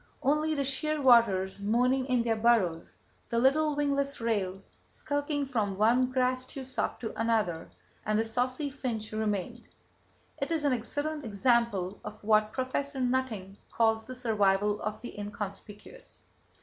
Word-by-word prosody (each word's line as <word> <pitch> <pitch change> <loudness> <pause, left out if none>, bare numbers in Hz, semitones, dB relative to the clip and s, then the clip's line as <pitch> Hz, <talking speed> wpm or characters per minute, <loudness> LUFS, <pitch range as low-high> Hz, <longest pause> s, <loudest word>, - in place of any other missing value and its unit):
Only 305 +3 +2
the 280 - 0
shearwaters 245 - +3
moaning 250 +5 +2
in 250 -3 +2
their 230 -1 +1
burrows, 215 -8 +1 0.3
the 235 - -1
little 290 +5 +3
wingless 280 -1 0
rail 200 -5 -1 0.3
skulking 290 0 -2
from 215 -7 -1
one 240 +4 +3
grass 255 0 0
tussock 265 -1 -4
to 225 - -4
another, 215 -7 0 0.3
and 215 0 0
the 225 - +1
saucy 255 +5 -1
finch 235 -6 -4
remained. 215 +2 -2 0.8
It 275 - -2
is 315 -3 0
an 280 - +3
excellent 290 +5 -3
example 215 -4 +1
of 210 0 -9
what 215 0 +3
Prof. 275 +3 -2
Nutting 245 -7 -1
calls 225 -1 +2
the 255 - -7
survival 210 -4 +1
of 215 0 -3
the 240 - -8
inconspicuous. 205 - -8
235 Hz, 135 wpm, -29 LUFS, 210-265 Hz, 0.8 s, shearwaters